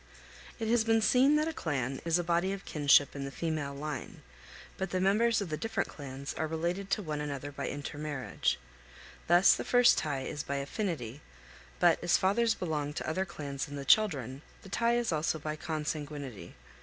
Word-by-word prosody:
It 225 Hz, -, -3 dB
has 230 Hz, 0 st, +3 dB
been 225 Hz, 0 st, +3 dB
seen 260 Hz, +6 st, +5 dB
that 305 Hz, +1 st, +2 dB
a 325 Hz, -, -2 dB
clan 135 Hz, -, -2 dB
is 165 Hz, 0 st, +3 dB
a 175 Hz, -, -1 dB
body 175 Hz, +2 st, +1 dB
of 195 Hz, -, -7 dB
kinship 145 Hz, -1 st, +4 dB
in 140 Hz, -, -4 dB
the 135 Hz, -, -4 dB
female 150 Hz, -2 st, -3 dB
line; 145 Hz, -2 st, -6 dB, 0.5 s
but 190 Hz, -, -3 dB
the 185 Hz, -, -1 dB
members 215 Hz, +4 st, +3 dB
of 195 Hz, -, -4 dB
the 155 Hz, -, -2 dB
different 225 Hz, 0 st, -2 dB
clans 140 Hz, -1 st, -7 dB
are 160 Hz, -, -2 dB
related 170 Hz, +5 st, -2 dB
to 210 Hz, -, 0 dB
one 150 Hz, -3 st, -3 dB
another 145 Hz, -1 st, -4 dB
by 140 Hz, -, -4 dB
intermarriage. 145 Hz, -1 st, -2 dB, 0.7 s
Thus 175 Hz, +3 st, +7 dB
the -, -, -2 dB
first 245 Hz, -1 st, +5 dB
tie 145 Hz, -3 st, -2 dB
is 150 Hz, +2 st, -4 dB
by 140 Hz, -, -4 dB
affinity; 140 Hz, -, -3 dB, 0.6 s
but, 175 Hz, -1 st, +4 dB
as 175 Hz, -, +4 dB
fathers 225 Hz, +4 st, +2 dB
belong 150 Hz, -4 st, -2 dB
to -, -, -4 dB
other 185 Hz, +5 st, 0 dB
clans 140 Hz, -6 st, -5 dB
than 145 Hz, -, -8 dB
the 140 Hz, -1 st, -5 dB
children, 140 Hz, -, +3 dB, 0.2 s
the 195 Hz, -, -11 dB
tie 235 Hz, +4 st, +2 dB
is 240 Hz, -4 st, 0 dB
also 155 Hz, 0 st, 0 dB
by 155 Hz, 0 st, -4 dB
consanguinity. 150 Hz, -, -5 dB
155 Hz, 190 wpm, -31 LUFS, 145-195 Hz, 0.7 s, Thus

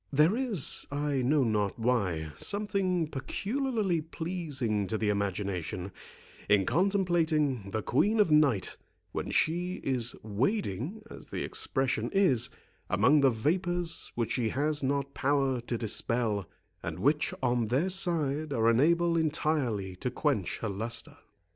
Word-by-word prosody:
There 155 Hz, +8 st, +4 dB
is, 235 Hz, -, +2 dB
I 145 Hz, -1 st, 0 dB
know 140 Hz, +3 st, +3 dB
not 105 Hz, -4 st, 0 dB
why, 100 Hz, -10 st, 0 dB
something 195 Hz, -4 st, 0 dB
peculiarly 200 Hz, -, -2 dB
pleasing 150 Hz, -, -2 dB
to 110 Hz, -, -1 dB
the 105 Hz, -1 st, 0 dB
imagination, 100 Hz, -2 st, -2 dB, 0.6 s
in 100 Hz, -2 st, +4 dB
contemplating 165 Hz, -, +1 dB
the 110 Hz, +1 st, -3 dB
Queen 210 Hz, -, +2 dB
of 205 Hz, -6 st, +4 dB
Night, 145 Hz, -10 st, +3 dB, 0.3 s
when -, -, -4 dB
she 175 Hz, +3 st, +1 dB
is 125 Hz, -3 st, 0 dB
wading, 135 Hz, -, -2 dB
as -, -, -10 dB
the -, -, -4 dB
expression 130 Hz, 0 st, -1 dB
is, 170 Hz, -, +4 dB, 0.4 s
among 125 Hz, +10 st, +4 dB
the 135 Hz, -, +6 dB
vapours 175 Hz, +8 st, -1 dB
which 115 Hz, -2 st, -1 dB
she 120 Hz, -3 st, 0 dB
has 145 Hz, +4 st, +1 dB
not 140 Hz, 0 st, -1 dB
power 135 Hz, -2 st, +1 dB
to 120 Hz, -, -1 dB
dispel, 110 Hz, -3 st, -1 dB, 0.3 s
and 85 Hz, -1 st, -5 dB
which 145 Hz, -, +2 dB
on 120 Hz, -2 st, +1 dB
their 135 Hz, -, +1 dB
side 155 Hz, -5 st, -1 dB
are 115 Hz, -2 st, +3 dB
unable 170 Hz, +8 st, +3 dB
entirely 145 Hz, -, 0 dB
to 125 Hz, -, -2 dB
quench 125 Hz, -, -1 dB
her 110 Hz, -, 0 dB
lustre. 115 Hz, +4 st, -4 dB
135 Hz, 135 wpm, -29 LUFS, 110-170 Hz, 0.6 s, the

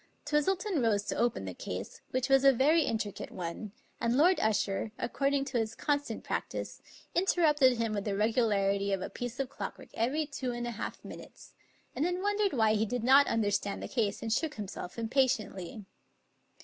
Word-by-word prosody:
Twistleton 335 Hz, +4 st, +1 dB
rose 210 Hz, -4 st, +2 dB
to -, -, -3 dB
open 235 Hz, -, 0 dB
the 95 Hz, -, -5 dB
case, 90 Hz, +2 st, -6 dB
which 255 Hz, -1 st, -1 dB
was 270 Hz, -1 st, +4 dB
a 275 Hz, -, +8 dB
very 295 Hz, +6 st, +3 dB
intri 215 Hz, -3 st, -2 dB
cate -, -, -7 dB
one, 180 Hz, +4 st, -6 dB, 0.3 s
and 235 Hz, +2 st, +1 dB
Lord 355 Hz, +5 st, +5 dB
Usher, 210 Hz, -1 st, 0 dB
according 275 Hz, +2 st, 0 dB
to 265 Hz, -3 st, -1 dB
his 220 Hz, -1 st, -2 dB
constant 290 Hz, -1 st, -1 dB
prac -, -, -2 dB
tice, -, -, -6 dB, 0.3 s
interrupted 300 Hz, -8 st, +4 dB
him 225 Hz, -1 st, -1 dB
with 205 Hz, -1 st, -2 dB
the 200 Hz, -2 st, -1 dB
regularity 200 Hz, -3 st, +2 dB
of 190 Hz, -, -1 dB
a -, -, -5 dB
piece 245 Hz, +1 st, -6 dB
of 270 Hz, -2 st, -1 dB
clockwork -, -, -7 dB
every 270 Hz, +8 st, 0 dB
two 265 Hz, -4 st, -4 dB
and 240 Hz, 0 st, -4 dB
a 240 Hz, -, -3 dB
half 225 Hz, -, -6 dB
minutes, -, -, -11 dB, 0.4 s
and 270 Hz, -, 0 dB
then 355 Hz, +2 st, -1 dB
won 410 Hz, 0 st, 0 dB
dered 405 Hz, -2 st, +2 dB
why 220 Hz, -4 st, +3 dB
he 220 Hz, 0 st, +2 dB
did 245 Hz, +1 st, -2 dB
not 270 Hz, +3 st, +6 dB
understand 205 Hz, -2 st, 0 dB
the -, -, -4 dB
case 215 Hz, -5 st, -1 dB
and 225 Hz, -1 st, 0 dB
shook 310 Hz, +2 st, -1 dB
him 210 Hz, -2 st, -5 dB
self 180 Hz, -1 st, -7 dB
impatiently. 220 Hz, -5 st, -1 dB
240 Hz, 195 wpm, -31 LUFS, 210-285 Hz, 0.4 s, a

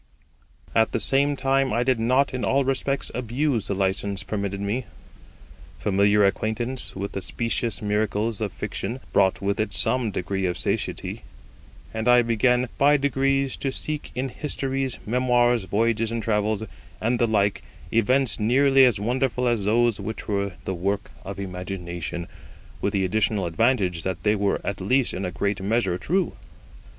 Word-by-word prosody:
At 110 Hz, 0 st, +2 dB
the -, -, +1 dB
same 140 Hz, +1 st, +2 dB
time 135 Hz, -1 st, +1 dB
I 120 Hz, -, +1 dB
did 125 Hz, -2 st, +1 dB
not 130 Hz, +5 st, +2 dB
in 125 Hz, -3 st, -3 dB
all 135 Hz, +7 st, +2 dB
respects 135 Hz, +1 st, 0 dB
abuse 125 Hz, 0 st, -1 dB
the 100 Hz, -, -1 dB
license 95 Hz, +1 st, -1 dB
permitted 100 Hz, -1 st, -3 dB
me. 105 Hz, +5 st, -2 dB, 0.9 s
Familiar 100 Hz, +1 st, +3 dB
acquaintance 115 Hz, +5 st, -2 dB
with 100 Hz, +1 st, -4 dB
the 95 Hz, -, -4 dB
specious 115 Hz, +2 st, +3 dB
miracles 105 Hz, +1 st, 0 dB
of 105 Hz, -3 st, -1 dB
fiction 120 Hz, +7 st, -4 dB
brought 95 Hz, -1 st, +2 dB
with 100 Hz, +1 st, 0 dB
it 110 Hz, -2 st, -1 dB
some 120 Hz, 0 st, +2 dB
degree 95 Hz, -1 st, -2 dB
of 90 Hz, -, -2 dB
satiety, -, -, -3 dB, 0.7 s
and 110 Hz, +1 st, -3 dB
I 125 Hz, 0 st, +6 dB
began 125 Hz, +2 st, +2 dB
by 145 Hz, +1 st, +5 dB
degrees 135 Hz, -1 st, +1 dB
to 135 Hz, -, -2 dB
seek 150 Hz, +2 st, -4 dB
in 130 Hz, +2 st, -2 dB
histories, 135 Hz, -1 st, -2 dB
memoirs, 120 Hz, -1 st, +2 dB
voyages 115 Hz, +3 st, 0 dB
and 115 Hz, -1 st, -3 dB
travels, 105 Hz, 0 st, 0 dB, 0.4 s
and 120 Hz, +2 st, 0 dB
the 120 Hz, -, +3 dB
like, 105 Hz, -2 st, +1 dB, 0.3 s
events 125 Hz, +2 st, +2 dB
nearly 135 Hz, +4 st, +5 dB
as 120 Hz, -6 st, +2 dB
wonderful 125 Hz, +3 st, 0 dB
as 115 Hz, -5 st, 0 dB
those 115 Hz, +1 st, +2 dB
which 110 Hz, -, -6 dB
were 100 Hz, -2 st, -1 dB
the 95 Hz, -, -2 dB
work 100 Hz, +3 st, -2 dB
of 100 Hz, 0 st, -7 dB
imagination, 90 Hz, -3 st, -5 dB, 0.5 s
with 100 Hz, -, 0 dB
the 95 Hz, -2 st, +1 dB
additional 105 Hz, 0 st, 0 dB
advantage 95 Hz, -2 st, +1 dB
that 95 Hz, 0 st, -4 dB
they 105 Hz, -, +3 dB
were 100 Hz, -1 st, 0 dB
at 100 Hz, -1 st, -3 dB
least 125 Hz, +6 st, +2 dB
in 95 Hz, -, -3 dB
a 90 Hz, -, -3 dB
great 100 Hz, +1 st, -2 dB
measure 95 Hz, -3 st, 0 dB
true. 185 Hz, +2 st, 0 dB
110 Hz, 160 wpm, -24 LUFS, 100-125 Hz, 0.9 s, I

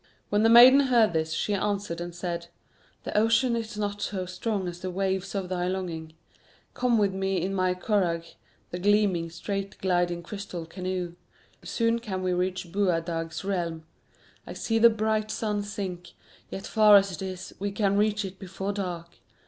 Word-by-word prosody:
When 205 Hz, 0 st, +2 dB
the 225 Hz, -, +5 dB
maiden 245 Hz, +4 st, +9 dB
heard 230 Hz, -5 st, +4 dB
this, 160 Hz, 0 st, 0 dB
she 205 Hz, +5 st, -1 dB
answered 200 Hz, -4 st, -2 dB
and 175 Hz, 0 st, -6 dB
said: 170 Hz, -1 st, -4 dB, 0.6 s
"The -, -, -6 dB
ocean 225 Hz, +3 st, +3 dB
is 220 Hz, -2 st, -4 dB
not 205 Hz, -1 st, -3 dB
so 190 Hz, -3 st, -2 dB
strong 190 Hz, +1 st, -3 dB
as 175 Hz, 0 st, -6 dB
the 185 Hz, -, -4 dB
waves 190 Hz, +1 st, -2 dB
of 195 Hz, -2 st, -2 dB
thy 180 Hz, -1 st, -2 dB
longing. 170 Hz, -4 st, -4 dB, 0.6 s
Come 245 Hz, -2 st, +2 dB
with 200 Hz, -3 st, +2 dB
me 190 Hz, 0 st, -1 dB
in 190 Hz, +3 st, -2 dB
my 185 Hz, -1 st, +1 dB
curragh, 180 Hz, -4 st, 0 dB, 0.5 s
the 175 Hz, -, -4 dB
gleaming, 195 Hz, -4 st, +2 dB
straight 195 Hz, +4 st, -4 dB
gliding 175 Hz, -2 st, 0 dB
crystal 185 Hz, -3 st, -6 dB
canoe. 180 Hz, 0 st, -4 dB, 0.5 s
Soon 230 Hz, 0 st, 0 dB
can 190 Hz, -5 st, -4 dB
we 185 Hz, -1 st, +1 dB
reach 180 Hz, -1 st, -2 dB
Boadag's 165 Hz, -3 st, -1 dB
realm. 170 Hz, -5 st, -2 dB, 0.6 s
I -, -, -6 dB
see 225 Hz, 0 st, 0 dB
the 235 Hz, +1 st, +8 dB
bright 215 Hz, -1 st, 0 dB
sun 210 Hz, -2 st, -1 dB
sink, 190 Hz, -4 st, -6 dB, 0.4 s
yet 195 Hz, -, -6 dB
far 215 Hz, -1 st, +6 dB
as 195 Hz, -1 st, +5 dB
it 175 Hz, -, -7 dB
is, 185 Hz, -1 st, -6 dB
we 200 Hz, +1 st, -2 dB
can 200 Hz, -1 st, +1 dB
reach 210 Hz, 0 st, +1 dB
it 190 Hz, 0 st, -8 dB
before 190 Hz, +1 st, -4 dB
dark. 175 Hz, -4 st, -5 dB
190 Hz, 175 wpm, -27 LUFS, 175-210 Hz, 0.6 s, maiden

